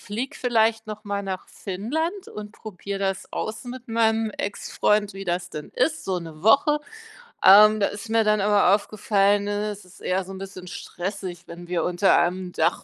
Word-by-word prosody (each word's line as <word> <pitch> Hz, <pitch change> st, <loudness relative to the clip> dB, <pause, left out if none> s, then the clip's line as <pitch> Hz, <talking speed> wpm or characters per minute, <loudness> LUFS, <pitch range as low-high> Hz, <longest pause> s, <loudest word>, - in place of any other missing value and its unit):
fliege 235 Hz, +6 st, -5 dB
vielleicht 225 Hz, -2 st, +1 dB
noch 215 Hz, 0 st, -7 dB
mal 200 Hz, -1 st, -2 dB
nach 190 Hz, -2 st, -5 dB
Finnland 320 Hz, -, -3 dB
und 210 Hz, 0 st, -8 dB
probiere 200 Hz, -2 st, -7 dB
das 195 Hz, -1 st, -3 dB
aus 220 Hz, 0 st, -4 dB
mit 250 Hz, 0 st, -8 dB
meinem 225 Hz, -1 st, +1 dB
Ex-Freund, 205 Hz, 0 st, 0 dB
wie 195 Hz, -, -7 dB
das 175 Hz, 0 st, -2 dB
denn 150 Hz, -, -7 dB
ist, 300 Hz, +5 st, +1 dB
so 190 Hz, -, -1 dB
1 165 Hz, -2 st, -10 dB
Woche. 285 Hz, +7 st, +4 dB, 0.6 s
Ähm, 215 Hz, +2 st, +8 dB
da 200 Hz, -, +3 dB
ist 210 Hz, +2 st, -8 dB
mir 225 Hz, -1 st, +3 dB
dann 210 Hz, -1 st, +3 dB
aber 200 Hz, -1 st, +5 dB
aufgefallen, 205 Hz, -1 st, +1 dB
ne, 205 Hz, +1 st, -1 dB
es 205 Hz, -1 st, -10 dB
ist 180 Hz, -, -18 dB
eher 185 Hz, +1 st, -1 dB
so 195 Hz, -, -8 dB
'n 190 Hz, -, -8 dB
bisschen 190 Hz, -2 st, -9 dB
stressig, 180 Hz, -1 st, -6 dB
wenn 175 Hz, +1 st, -10 dB
wir 175 Hz, -2 st, 0 dB
unter 180 Hz, +2 st, +3 dB
einem 180 Hz, +1 st, 0 dB
Dach 200 Hz, -, 0 dB
205 Hz, 185 wpm, -24 LUFS, 185-220 Hz, 0.6 s, Ähm